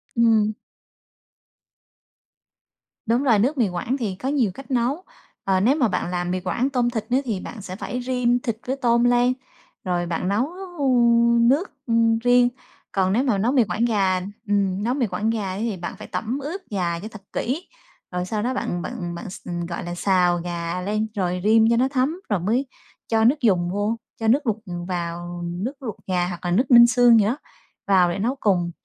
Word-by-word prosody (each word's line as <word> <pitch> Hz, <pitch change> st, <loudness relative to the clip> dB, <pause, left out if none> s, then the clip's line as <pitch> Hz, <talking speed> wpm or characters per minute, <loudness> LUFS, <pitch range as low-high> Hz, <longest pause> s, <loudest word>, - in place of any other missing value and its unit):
Ừm. 220 Hz, -2 st, +3 dB, 2.5 s
Đúng 235 Hz, +5 st, +1 dB
rồi, 230 Hz, -6 st, +4 dB
nước 265 Hz, +8 st, +1 dB
mì 230 Hz, -6 st, +2 dB
Quảng 205 Hz, +10 st, -2 dB
thì 210 Hz, -7 st, -3 dB
có 260 Hz, +8 st, -4 dB
nhiều 255 Hz, -9 st, +1 dB
cách 270 Hz, +5 st, -11 dB
nấu. 260 Hz, +8 st, 0 dB, 0.4 s
Ờ, 190 Hz, -1 st, +2 dB
nếu 240 Hz, +9 st, +3 dB
mà 260 Hz, -7 st, +2 dB
bạn 180 Hz, -2 st, -2 dB
làm 175 Hz, 0 st, -2 dB
mì 185 Hz, -, -1 dB
Quảng 235 Hz, +8 st, -1 dB
tôm 250 Hz, -3 st, +1 dB
thịt 225 Hz, -3 st, -3 dB
nữa 255 Hz, -, +4 dB
thì 215 Hz, -6 st, -2 dB
bạn 215 Hz, +2 st, -8 dB
sẽ 185 Hz, -1 st, -7 dB
phải 245 Hz, +5 st, -4 dB
rim 245 Hz, -1 st, +1 dB
thịt 230 Hz, -3 st, -3 dB
với 265 Hz, -, 0 dB
tôm 240 Hz, -2 st, +2 dB
lên, 245 Hz, +1 st, +3 dB, 0.5 s
rồi 175 Hz, -2 st, -1 dB
bạn 170 Hz, +1 st, -2 dB
nấu, 215 Hz, +8 st, +1 dB, 0.3 s
ừm, 235 Hz, -3 st, +4 dB
nước, 300 Hz, +8 st, +1 dB, 0.2 s
ừm, 230 Hz, -1 st, +3 dB
riêng. 245 Hz, +1 st, +4 dB, 0.4 s
Còn 190 Hz, -1 st, +1 dB
nếu 245 Hz, +5 st, +2 dB
mà 235 Hz, -7 st, +1 dB
nấu 225 Hz, +6 st, +1 dB
mì 260 Hz, -3 st, +4 dB
Quảng 225 Hz, +2 st, -1 dB
gà, 195 Hz, -5 st, +2 dB, 0.3 s
ừm, 200 Hz, -1 st, +1 dB
nấu 240 Hz, +3 st, +1 dB
mì 260 Hz, -4 st, 0 dB
Quảng 205 Hz, +4 st, -1 dB
gà 210 Hz, -4 st, -1 dB
ấy 190 Hz, +3 st, -4 dB
thì 225 Hz, -4 st, -2 dB
bạn 175 Hz, -, -6 dB
phải -, -, -9 dB
tẩm 240 Hz, +5 st, -3 dB
ướp 320 Hz, +8 st, -5 dB
gà 175 Hz, -4 st, -1 dB
cho 210 Hz, -, -7 dB
thật 215 Hz, -2 st, -11 dB
kỹ. 290 Hz, +10 st, -2 dB, 0.4 s
Rồi 180 Hz, 0 st, -2 dB
sau 210 Hz, +3 st, -2 dB
đó 255 Hz, +2 st, 0 dB
bạn 175 Hz, -8 st, -2 dB
bạn 175 Hz, 0 st, -5 dB
bạn 175 Hz, -, -7 dB
x -, -, -11 dB
ừm, 175 Hz, -1 st, -3 dB
gọi 170 Hz, +1 st, -5 dB
là, 175 Hz, 0 st, -5 dB
xào 180 Hz, -1 st, +2 dB
gà 170 Hz, +1 st, -4 dB
lên 215 Hz, +3 st, -1 dB
rồi 180 Hz, -2 st, -1 dB
rim 220 Hz, +1 st, +5 dB
cho 235 Hz, -, +3 dB
nó 255 Hz, +2 st, +3 dB
thấm 275 Hz, +5 st, 0 dB
rồi 205 Hz, -, +1 dB
mới 225 Hz, +10 st, 0 dB, 0.4 s
cho 220 Hz, -1 st, +2 dB
nước 270 Hz, +6 st, +4 dB
dùng 180 Hz, -6 st, +2 dB
vô, 205 Hz, +4 st, -1 dB, 0.2 s
cho 225 Hz, -, -1 dB
nước 260 Hz, +4 st, +3 dB
luộc 220 Hz, -, +1 dB, 0.3 s
vào, 175 Hz, 0 st, -4 dB
nước 180 Hz, +10 st, -3 dB
luộc 225 Hz, -4 st, -4 dB
gà 180 Hz, -2 st, +1 dB
hoặc 175 Hz, 0 st, -7 dB
là 175 Hz, -, 0 dB
nước 245 Hz, +9 st, +1 dB
ninh 235 Hz, -1 st, +9 dB
xương 240 Hz, -2 st, +5 dB
gì 205 Hz, -, +3 dB
đó 240 Hz, +7 st, 0 dB, 0.5 s
vào 185 Hz, -3 st, +4 dB
để 185 Hz, -, -4 dB
nấu 245 Hz, +7 st, 0 dB
cùng. 175 Hz, -4 st, +1 dB
220 Hz, 210 wpm, -23 LUFS, 185-245 Hz, 2.5 s, ninh